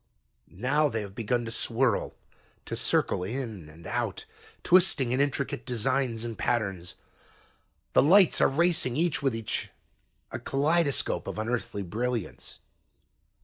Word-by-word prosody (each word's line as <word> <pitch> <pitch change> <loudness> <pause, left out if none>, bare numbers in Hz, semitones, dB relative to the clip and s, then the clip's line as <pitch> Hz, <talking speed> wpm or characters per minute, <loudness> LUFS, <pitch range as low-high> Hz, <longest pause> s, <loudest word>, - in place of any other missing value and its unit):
"Now 145 +9 +2
they 115 -4 -2
have 100 -2 -8
begun 120 +2 -1
to 115 - -5
swirl, 120 0 0 0.5
to - - -4
circle 90 - 0
in 110 - -5
and 80 +2 -15
out, - - -3 0.4
twisting 175 -9 +4
in 130 +2 +2
intricate 140 -1 -1
designs 125 -1 -1
and 115 -1 -5
patterns. 95 -8 -2 1.0
The - - +6
lights 185 +5 +5
are - - +6
racing 155 -4 +2
each 165 -3 +1
with 135 -4 0
each, 115 -1 -3 0.6
a - - -4
kaleidoscope 145 +1 0
of - - -5
unearthly 110 -2 -2
brilliance. 115 +3 -4
125 Hz, 130 wpm, -28 LUFS, 110-140 Hz, 1.0 s, The